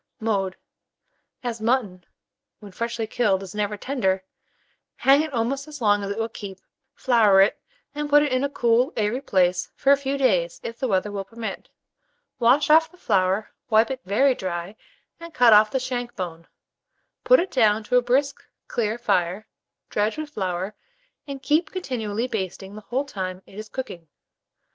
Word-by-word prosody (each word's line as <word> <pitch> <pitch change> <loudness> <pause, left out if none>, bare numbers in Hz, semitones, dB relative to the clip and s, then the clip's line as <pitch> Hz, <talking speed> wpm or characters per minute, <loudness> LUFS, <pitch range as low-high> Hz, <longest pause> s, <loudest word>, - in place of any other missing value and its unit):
Mode. 200 -4 -1 0.9
As 235 -2 -4
mutton, 220 -7 -1 0.5
when 205 -2 -12
freshly 230 +3 -3
killed, 205 -4 0
is 185 - -9
never 210 0 -2
tender, 195 -7 -1 0.7
hang 275 +2 +4
it 310 -1 -4
almost 270 +3 -2
as 300 -1 -9
long 205 -3 +2
as 200 - -4
it 200 - -4
will 225 0 -1
keep; 200 -4 -9 0.4
flour 220 -6 +4
it, 195 - +3 0.3
and 295 0 -4
put 295 0 +6
it 295 - -1
in 255 +1 +1
a 280 - 0
cool 245 +1 +2
airy 220 +4 0
place 180 -5 +1
for 275 - +3
a 280 - +6
few 280 0 -2
days, 185 -11 +1
if 230 0 -7
the 260 - -1
weather 200 -1 0
will 200 -1 -4
permit. 225 +3 -7 0.7
Wash 255 +6 +4
off 320 +1 +6
the 360 - -21
flour, 190 - 0 0.2
wipe 220 +3 +4
it 260 -1 -5
very 260 +8 +3
dry, 180 -2 -5 0.4
and 335 -1 -11
cut 240 -3 +6
off 210 +1 +6
the 265 - -1
shank 245 -1 -4
bone; 170 -4 -6 0.8
put - - +6
it 370 - -2
down 220 -4 +3
to 230 - -1
a - - +5
brisk 270 +3 0 0.2
clear 220 -1 -1
fire, 185 -3 0 0.5
dredge 210 +6 0
with 310 -1 -5
flour, 190 -2 -3 0.5
and 275 -1 -7
keep 310 +3 +2
continually 240 - -3
basting 195 -3 -5
the 215 - -9
whole 255 +7 -2
time 185 -7 -5
it - - -18
is 215 0 -8
cooking. 180 -11 -7
225 Hz, 175 wpm, -24 LUFS, 195-265 Hz, 0.9 s, put